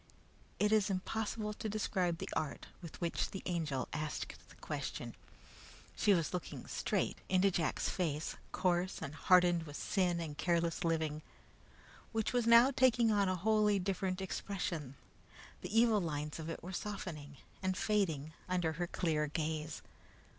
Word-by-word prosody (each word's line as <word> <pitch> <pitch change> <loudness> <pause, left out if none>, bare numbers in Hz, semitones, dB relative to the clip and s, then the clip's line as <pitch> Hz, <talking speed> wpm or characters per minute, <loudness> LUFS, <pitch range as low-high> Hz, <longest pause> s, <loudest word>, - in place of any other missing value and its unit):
It 210 0 +2
is 215 -2 +4
impossible 210 +3 -2
to 215 - -4
describe 185 -5 0
the - - -6
art 150 -3 -2 0.2
with 170 -3 -9
which 170 -1 -1
the 190 - -6
Angel 155 -7 -1
asked 150 0 -3 0.2
the - - -15
question. - - -5 0.8
She 210 - +3
was 170 -4 +2
looking 180 - -4
straight - - -1
into 190 +1 +4
Jack's 165 -3 0
face, 160 -4 -1 0.2
coarse 180 0 +1
and 140 - -5
hardened 175 0 +4
with 145 - -7
sin 180 -4 +1
and 155 -3 -4
careless 170 +2 +1
living, 160 -2 0 0.9
which 225 +1 0
was 245 -2 +2
now 235 +3 +8
taking 245 -3 +4
on 200 -2 +3
a 185 - +1
wholly 210 +2 +3
different 190 0 -1
expression. 175 -7 -3 0.7
The 180 - -5
evil 225 -3 +4
lines 150 -2 -3
of 160 0 -5
it 165 - -5
were 185 +2 -6
softening 165 -8 -5 0.2
and 185 -1 0
fading 160 -9 0 0.2
under 175 -3 +1
her 175 +3 -2
clear 155 -4 0
gaze. 155 0 -3
180 Hz, 150 wpm, -35 LUFS, 160-200 Hz, 0.9 s, now